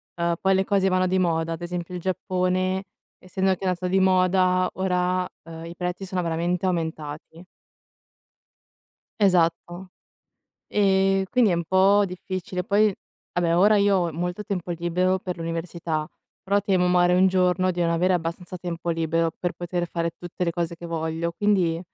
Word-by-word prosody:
uhm, 170 0 0
poi 190 0 +3
le 190 - +2
cose 195 -1 +1
vanno 185 0 +2
di 185 +1 +1
moda, 165 -2 0
ad 165 - -7
esempio 175 0 -5
il 180 - -4
Giappone, 185 +1 -1 0.3
essendo 190 +1 -1
che 190 - -6
è - - +1
andato 180 0 -1
di 190 +1 +2
moda, 185 -1 +3
ora, 180 -1 0
uhm, 165 0 -9
i 170 +1 -8
prezzi 180 +2 -4
sono 185 -2 -2
veramente 170 +3 -1
aumentati. 160 -1 -4 1.7
Esatto. 175 -1 +1 0.8
Ehm, 195 -1 +2
quindi 245 -5 +4
è - - +2
un 170 0 -2
po' 195 +4 +4
difficile. 185 0 -5
Poi, 205 +1 +2 0.4
vabbè, 170 -1 +1
ora 210 +4 +5
io 200 -1 +3
ho 175 -3 0
molto 180 +5 -3
tempo 180 -4 -4
libero 175 +2 0
per 180 -1 -5
l'università, 165 -1 -3 0.4
però 200 +1 +1
temo, 185 -3 +1
magari, 180 0 +4
un 185 +1 +5
giorno 185 0 +2
di 175 0 -3
non 170 - +2
avere 175 +3 +2
abbastanza 175 +1 -3
tempo 170 -1 -4
libero, 165 0 0
per 175 - -2
poter 175 0 -3
fare 170 -1 -2
tutte 175 +2 -5
le 170 - 0
cose 170 0 -3
che 170 - -12
voglio, 165 0 -2
quindi 180 -4 +1
180 Hz, 165 wpm, -24 LUFS, 170-190 Hz, 1.7 s, ora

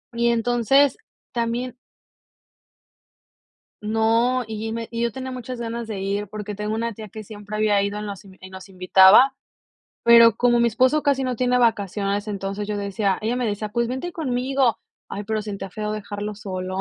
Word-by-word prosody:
Y, 235 0 +1
entonces, 240 +4 +3 0.4
también 240 +1 -2 2.1
No, 225 +4 +1
y 220 0 -5
y - - -4
me 230 0 -4
y 230 0 -3
yo 235 - 0
tenía 260 +2 -6
muchas 250 0 -6
ganas 235 0 -4
de 205 -3 -5
ir, 200 +2 -2
porque 210 +1 -6
tengo 210 +1 -3
una 230 +1 -2
tía 215 0 -10
que 215 +2 -9
siempre 205 0 -9
había 210 -2 +2
ido, 200 +1 -2
nos 205 -2 -7
in 190 -1 -16
y 190 - -11
nos 190 +1 -11
invitaba. 190 +7 +6 0.7
Pero 230 -1 +7
como 240 0 +3
mi 235 - +4
esposo 255 +6 +2
casi 275 -2 +1
no 255 - -1
tiene 250 +1 +1
vacaciones, 205 -3 0
entonces 200 0 -4
yo 210 - -2
decía 200 0 -1
ella 225 +3 0
me 250 -1 -1
decía: 210 0 -3
"Pues, 235 +1 0
vente 260 +8 -4
conmigo". 260 -4 0 0.3
Ay, 205 - -6
pero 220 0 -2
siente 200 -2 -6
feo 210 +2 -4
dejarlo 210 0 -5
solo. 185 -2 -5
220 Hz, 180 wpm, -23 LUFS, 205-240 Hz, 2.1 s, Pero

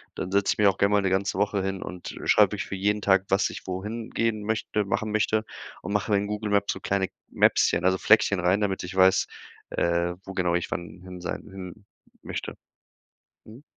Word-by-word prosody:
dann 90 - -4
setze 100 0 +2
ich - - -17
mich 105 - +5
auch 95 - +2
gern 100 +1 +3
mal 105 0 +4
'ne 95 - +1
ganze 95 0 0
Woche 100 -1 +1
hin 95 0 -3
und 90 -1 -7
schreibe - - +5
wirklich - - -3
für - - -5
jeden 105 +2 0
Tag, 95 -1 +3
was 95 +1 +2
ich - - -9
wohin 105 +5 -5
gehen 115 -2 -1
möchte 110 0 -1
machen 110 +2 -2
möchte 110 +1 +1 0.4
und 100 - -4
mache 105 +1 0
mir 100 - +5
in 100 +1 -1
Google 105 0 -3
Maps 100 0 +2
so 95 - -10
kleine 100 -1 0 0.2
Mapschen, 90 - +3
also, 95 0 +3
Fleckchen 100 -2 +4
rein, 90 +3 +3
damit 100 -2 -1
ich 90 +1 -6
weiß, 95 0 +5 0.4
äh, 85 0 0
wo 95 - -7
genau 90 -2 0
ich 85 - -1
wann 85 -1 -6
hin 90 -1 -10
sein 85 - -4
hin 95 +1 -10 0.4
möchte. - - -5 0.9
Mhm. 115 +5 -13
100 Hz, 215 wpm, -26 LUFS, 95-105 Hz, 0.9 s, mich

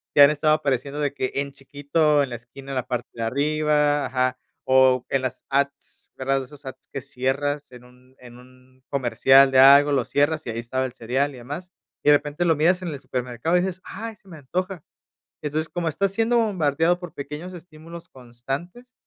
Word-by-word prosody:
ya 145 - +9
han - - +4
estado 150 +1 +2
apareciendo 140 -1 -1
de 145 -2 -1
que 130 -2 -2
en 140 0 -2
chiquito 145 +2 +1
en 140 - -1
la 120 - -5
esquina, 130 +4 -11
en - - -4
la 130 -1 -2
parte 125 -1 -4
de 115 - -5
arriba. 150 +3 +1
Ajá. 130 0 0 0.3
O 130 -1 +4
en 135 -1 0
las 130 0 -4
ads, 140 +1 -3
¿verdad? 135 0 -1
Esos 145 +2 -15
ads 130 - -10
que 140 - -6
cierras 140 +2 -2
en 125 -1 -13
un 125 +1 -21
en 120 -1 -13
un 130 +1 -20
comercial 135 0 +5
de 130 - +2
algo, 140 +2 +8
lo 135 -4 +1
cierras 155 +2 0
y 115 - -3
ahí 115 - -4
estaba 130 +3 -2
el 125 - -6
cereal 130 +4 -1
y 130 - -11
demás 150 +9 -7 0.3
y - - +4
de 145 - +8
repente 150 +4 -4
lo 165 -2 +3
miras 175 +5 +2
en 175 - -3
el 145 -3 -6
supermercado 125 +7 -2
y - - +2
dices: 185 0 -4
"ay, 225 +3 -7
se 200 - -28
me 170 -4 -11
antoja". 180 +5 -4 0.6
Entonces, 155 +2 -2
como 175 -2 -2
estás 190 +5 -1
siendo 225 +3 +1
bombardeado 175 -5 +1
por 175 -3 -8
pequeños 150 +6 -7
estímulos 170 0 -12
constantes, 135 - -7
140 Hz, 205 wpm, -23 LUFS, 130-160 Hz, 0.6 s, ya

